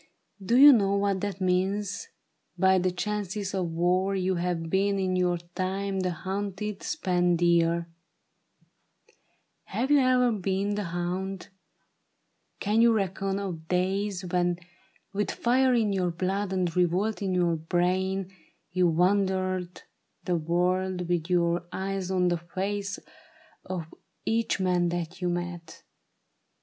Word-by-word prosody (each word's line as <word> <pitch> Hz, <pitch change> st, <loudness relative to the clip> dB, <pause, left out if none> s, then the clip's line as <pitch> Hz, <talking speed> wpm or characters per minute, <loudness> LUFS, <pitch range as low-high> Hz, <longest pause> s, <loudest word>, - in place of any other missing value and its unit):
Do 235 Hz, +6 st, +2 dB
you 285 Hz, +2 st, +10 dB
know 200 Hz, -4 st, +2 dB
what 200 Hz, -1 st, 0 dB
that 200 Hz, -1 st, -3 dB
means? 190 Hz, +2 st, 0 dB, 0.5 s
By 190 Hz, +1 st, +4 dB
the 185 Hz, +1 st, +1 dB
chances 200 Hz, +1 st, -3 dB
of 185 Hz, -3 st, -1 dB
war 180 Hz, +4 st, +1 dB
You 190 Hz, 0 st, 0 dB
have 175 Hz, -2 st, -2 dB
been 195 Hz, +3 st, +1 dB
in 185 Hz, -1 st, 0 dB
your 180 Hz, -1 st, +1 dB, 0.2 s
time 190 Hz, +1 st, -2 dB
the 185 Hz, -1 st, 0 dB
hunted, 195 Hz, +3 st, -4 dB
spent 180 Hz, -, +1 dB
deer; 170 Hz, 0 st, +2 dB, 1.8 s
Have 260 Hz, +4 st, -2 dB
you 290 Hz, -, +6 dB
e'er 255 Hz, -2 st, +3 dB
been 195 Hz, 0 st, -1 dB
the 205 Hz, -1 st, -2 dB
hound? 180 Hz, +2 st, -4 dB, 1.1 s
Can 210 Hz, +3 st, +2 dB
you 235 Hz, 0 st, +6 dB
reckon 195 Hz, -1 st, -1 dB
of 175 Hz, -5 st, -5 dB
days 190 Hz, +1 st, -1 dB
When, 175 Hz, 0 st, 0 dB, 0.6 s
with 205 Hz, +1 st, -1 dB
fire 255 Hz, +1 st, +2 dB
in 215 Hz, -4 st, +2 dB
your 185 Hz, -2 st, +1 dB
blood 190 Hz, +3 st, -2 dB
and 180 Hz, -3 st, -1 dB
revolt 180 Hz, +5 st, +1 dB
in 190 Hz, -2 st, -1 dB
your 175 Hz, -2 st, +2 dB
brain. 185 Hz, +3 st, 0 dB, 0.4 s
You 180 Hz, 0 st, +3 dB
wandered 185 Hz, +1 st, 0 dB, 0.4 s
the 180 Hz, -, +1 dB
world 180 Hz, +2 st, 0 dB
with 175 Hz, -1 st, 0 dB
your 175 Hz, -1 st, +1 dB
eyes 190 Hz, -1 st, -3 dB
on 180 Hz, -1 st, +2 dB
the 175 Hz, -, +1 dB
face 200 Hz, +4 st, -3 dB, 0.7 s
Of 180 Hz, -3 st, -4 dB, 0.4 s
each 225 Hz, -2 st, 0 dB
man 180 Hz, -2 st, +2 dB
that 175 Hz, +1 st, -4 dB
you 180 Hz, -, 0 dB
met 175 Hz, -2 st, -5 dB
185 Hz, 135 wpm, -27 LUFS, 175-200 Hz, 1.8 s, you